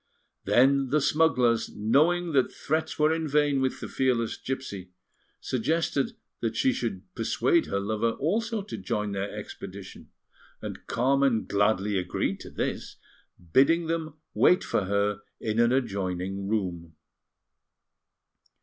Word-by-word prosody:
Then 135 +2 +4
the 150 - +3
smugglers, 130 -6 +2
knowing 165 +11 +2
that 135 -4 +2
threats 160 +2 -2
were 155 +1 +3
in 160 -1 -2
vain 145 -1 +2
with 130 -1 -1
the - - -4
fearless 125 -4 0
gipsy, 100 -9 -5 0.5
suggested 140 +2 -1 0.2
that 115 -1 -2
she 130 +3 +2
should 105 -6 -3
persuade 120 +8 +1
her 100 - -1
lover 110 +3 0
also 220 +7 -1
to 205 - -7
join 105 -3 -2
their 100 +1 -3
expedition; 95 0 -9 0.5
and - - -8
Carmen 135 -1 +2
gladly 100 -1 +1
agreed 90 0 -2
to - - -9
this, - - -4 0.6
bidding 165 +6 +5
them 160 -2 -3 0.2
wait 180 - +4
for 100 - 0
her 100 +1 0 0.2
in 110 0 -1
an 120 0 +4
adjoining 95 -5 -2
room. 90 -6 -3
120 Hz, 130 wpm, -27 LUFS, 100-150 Hz, 0.6 s, bidding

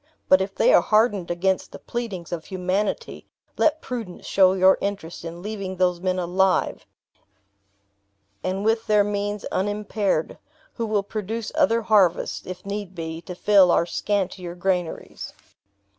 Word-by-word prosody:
But 185 0 +6
if 195 +1 -3
they - - +4
are - - +7
hardened 215 -4 +2
against 185 +2 0
the - - -8
pleadings 210 -8 -5
of 165 -2 -4
humanity, 185 +2 -2 0.3
let 315 0 +2
prudence 230 -8 -6
show 190 -1 +4
your 190 0 +5
interest 195 -5 -4
in 170 +1 -7
leaving 200 -3 -4
those 180 -1 +1
men 185 0 0
alive, 185 +1 +1 1.6
and 190 +2 -2
with 225 +1 +1
their 210 -1 +4
means 205 0 -3
unimpaired, 205 -3 -1 0.3
who 230 -2 -3
will 210 -2 +1
produce 215 +2 -4
other 280 -7 +2
harvests, 200 -6 +2
if 185 0 -7
need 200 -2 -5
be, 165 -1 -5
to 180 +1 -8
fill 195 -1 +5
our 170 - +3
scantier 185 -2 -2
granaries. 180 -2 -3
195 Hz, 145 wpm, -24 LUFS, 180-210 Hz, 1.6 s, are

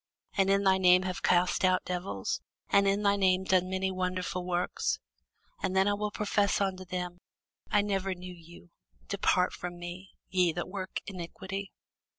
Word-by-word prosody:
and 195 -1 +3
in 195 0 +3
thy 190 -1 +4
name 180 0 +6
have 185 -1 -3
cast 180 +2 +3
out 185 0 +3
devils? 180 - -3 0.3
and 200 0 +5
in 200 +1 +2
thy 200 0 +4
name 190 -1 +3
done 185 -1 +2
many 190 0 0
wonderful 185 0 -2
works? 180 0 -1 0.6
And 185 - -1
then 190 0 +5
will 210 +1 -2
I - - -9
profess 205 -1 +2
unto 190 -2 -1
them, 180 -1 -4 0.5
I 210 -1 +3
never 195 -2 -1
knew 180 0 -8
you: 170 - -15 0.4
depart 180 0 +2
from 175 0 -6
me, 175 +2 -8 0.2
ye 180 -3 +2
that 175 - -3
work 190 0 -4
iniquity. 195 +1 -6
185 Hz, 165 wpm, -30 LUFS, 180-195 Hz, 0.6 s, name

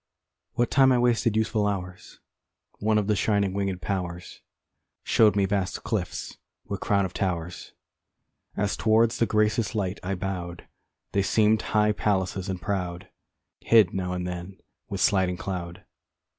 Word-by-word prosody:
] - - -60
What 120 -1 +1
time 135 -1 +5
I 125 - +4
wasted 120 -2 +2
youthful 110 -1 +1
hours 90 -2 -5 0.6
One 110 +1 +2
of 105 - +1
the 105 +1 +1
shining 100 -2 +1
wingèd 100 -2 -2
powers, 90 -2 -4 0.6
Show'd 110 -2 +4
me 100 -1 +3
vast 95 -1 -2
cliffs - - -4 0.3
with - - -4
crown 100 -1 +1
of 95 - -6
towers, 90 -3 -3 0.8
As 100 0 0
towards 115 +1 +2
the 115 - +3
gracious 110 -1 +1
light 100 -2 -2
I 95 +2 -2
bow'd, 90 -2 -5 0.4
They 100 - +2
seem'd 110 +2 +3
high 105 0 +2
palaces 95 -3 -1
and 95 -1 -3
proud, 90 -1 -3 0.5
Hid 110 -6 +4
now 90 -1 -2
and 90 0 -3
then 90 +2 -6 0.3
with 100 -1 -3
sliding 95 -3 +2
cloud. 90 -3 -6
100 Hz, 150 wpm, -26 LUFS, 90-105 Hz, 0.8 s, time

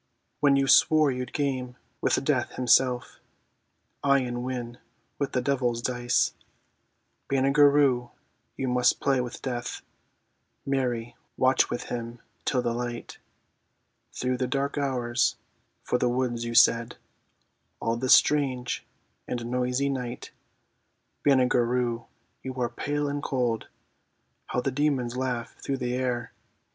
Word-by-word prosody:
When 145 -2 +4
you 135 0 +3
swore 155 +1 +5
you'd 125 -1 -4
game 130 -4 -2 0.3
with - - +1
Death - - 0
himself; 125 0 +2 0.8
Aye, 140 -1 +4
and 120 -1 -3
win 125 -2 -5 0.4
with 140 - -2
the 125 - 0
devil's 125 -4 0
dice. 120 0 +1 1.0
Banagher 140 +2 +5
Rhue, 130 -4 +2 0.5
you 135 - -2
must 125 0 +2
play 135 -2 +2
with 125 0 -7
Death, 120 -2 -4 0.8
(Mary, 120 -4 -1 0.2
watch 130 0 +3
with - - -3
him 120 0 -6 0.3
till 125 -2 +1
the 120 - 0
light!) 120 0 -5 0.9
Through 125 0 -2
the 130 0 -1
dark 140 +2 -1
hours, 130 -4 0 0.5
for 125 - 0
the 125 - +2
words 120 -1 -1
you 115 0 -4
said, 115 0 +4 0.8
All 115 - 0
this 125 +2 +6
strange 130 -4 +1 0.4
and 120 -1 -3
noisy 125 +2 0
night. 125 -3 -4 0.9
Banagher 130 -3 +4
Rhue, 120 -1 -1 0.3
you 130 -1 -6
are 125 -2 -1
pale 145 +4 -2
and 145 0 -2
cold; 125 -6 -1 0.8
(How 125 - -1
the 135 - -1
demons 130 -3 0
laugh 125 -2 -3
through 135 - -2
the 125 -1 -2
air!) 125 -2 -2
125 Hz, 130 wpm, -27 LUFS, 120-135 Hz, 1.0 s, this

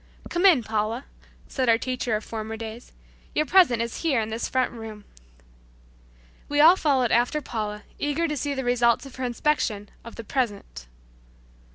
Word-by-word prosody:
"Come 350 +3 +4
in, 310 -11 +5
Paula," 220 +4 -2 0.4
said 260 -3 -1
our 225 - +6
teacher 250 -2 -2
of 215 - -3
former 220 0 -5
days. 225 +2 -8 0.4
"Your 305 - +2
present 280 -9 +4
is 235 - -5
in - - -7
here 265 -5 +2
in 220 -1 -2
this 225 +1 -3
front 260 -1 +1
room." 220 -3 -9 1.4
We 290 0 0
all 325 +4 +8
followed 270 -9 +1
after 245 +6 +2
Paula, 210 -6 -5 0.2
eager 295 +3 0
to 300 - -2
see 285 0 -2
the 265 - -3
result 240 0 +2
of 270 - -12
her 260 - -4
inspection 240 -4 -1
of 230 - -10
the 230 - -7
"present." 200 - -3
240 Hz, 175 wpm, -25 LUFS, 220-280 Hz, 1.4 s, all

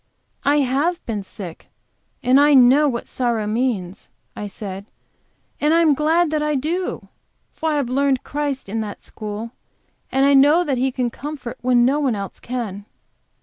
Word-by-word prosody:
"I 290 +1 +3
have 285 +7 0
been 215 -3 -3
sick, 185 -3 -9 0.6
and 255 +2 +5
I 290 0 +5
know 270 +4 +6
what 235 -2 -4
sorrow 235 -4 -1
means," 210 -4 -2 0.3
I 210 - -5
said. 195 0 -7 0.7
"And 300 +2 +3
I 335 - +5
am 310 -3 +5
glad 315 +3 +2
that 305 -1 0
I 300 0 0
do. 335 +7 -3 0.4
For 320 - -2
I 305 - 0
have 285 -4 0
learned 270 +1 +1
Christ 285 -4 -3
in 220 +3 -2
that 210 -2 -6
school, 215 +1 -6 0.6
and 270 +1 +3
I 280 - +5
know 290 +6 +6
that 275 -7 -1
He 265 +1 +1
can 250 -2 -2
comfort 275 -4 -7
when 245 -1 +3
no 275 +4 +2
one 265 -6 +1
else 200 -2 -6
can." 220 -5 -5
260 Hz, 175 wpm, -21 LUFS, 225-295 Hz, 0.7 s, know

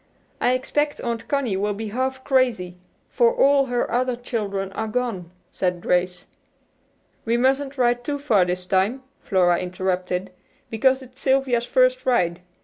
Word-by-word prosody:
I 250 - +2
expect 290 +3 -1
Aunt 235 -1 -4
Connie 265 -9 0
will 205 +1 -1
be 220 +1 -5
half 260 +3 -2
crazy, 240 -10 +1 0.3
for 475 -1 +3
all 280 - +4
her 245 -1 -1
other 250 0 +1
children 205 -5 -3
are 220 +3 -3
gone," 215 -7 -3 0.2
said 180 -2 -1
Grace. 180 +1 0 1.0
"We 230 +1 +1
mustn't 270 +2 +1
ride 245 -1 +2
too 285 +3 -2
far 235 -10 +3
this 180 0 -3
time," 195 +8 0 0.2
Flora 180 -4 +2
interrupted, 180 0 -2 0.4
"because 260 +4 +2
it's 255 0 -15
Sylvia's 265 -3 +2
first - - +3
ride. 180 -8 +1
240 Hz, 145 wpm, -23 LUFS, 190-260 Hz, 1.0 s, all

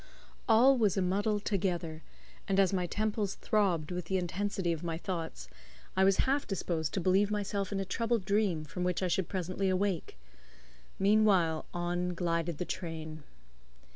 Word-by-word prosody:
All 250 +4 +6
was 205 -4 +2
a - - +3
muddle 205 +3 +1
together, 175 -6 -2 0.5
and 195 -1 +2
as 195 -1 +4
my 180 -2 0
temples 210 0 -1
throbbed 185 -8 0
with 180 -1 -3
the 190 +3 0
intensity 185 0 -1
of 160 - -6
my 165 -1 -2
thoughts, 165 - -5 0.5
I 190 - +4
was 195 0 +4
half 275 +2 0
disposed 165 -5 -2
to - - +1
believe 190 +3 +3
myself 205 -1 -2
in 200 - -1
a 195 - -2
troubled 230 +1 -1
dream 200 -6 +1
from 180 +4 -5
which 180 +1 0
I - - +2
should 180 0 0
presently 185 +1 -1
awake. 185 - -1 0.8
Meanwhile, 195 -6 +3
on 175 +1 -2
glided 170 -2 -1
the 180 - -3
train. 160 -3 -5
185 Hz, 165 wpm, -31 LUFS, 170-205 Hz, 0.8 s, All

